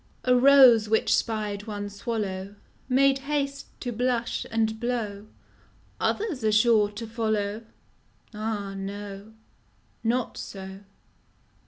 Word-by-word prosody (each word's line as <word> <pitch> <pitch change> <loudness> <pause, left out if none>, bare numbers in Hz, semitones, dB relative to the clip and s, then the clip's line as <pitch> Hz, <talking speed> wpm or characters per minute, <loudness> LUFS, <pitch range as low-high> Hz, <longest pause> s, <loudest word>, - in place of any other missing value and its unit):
A 250 -1 +4
ROSE 250 -4 +7
which 220 - +3
spied 210 -2 -2
one 205 -1 -4
swallow 200 -2 -4 0.3
Made 270 +1 +4
haste 280 0 -2
to 245 - -3
blush 240 0 -1
and 220 -1 0
blow: 220 -4 -3 0.4
" - - -26
Others 370 - -1
are 215 - +3
sure 215 -1 +4
to 210 +3 -7
follow: 220 -2 -2 0.4
" - - -36
Ah 210 -2 -3
no, 200 +1 -7 0.7
not 240 +1 -1
so! 190 -1 -8
220 Hz, 120 wpm, -26 LUFS, 205-245 Hz, 0.7 s, ROSE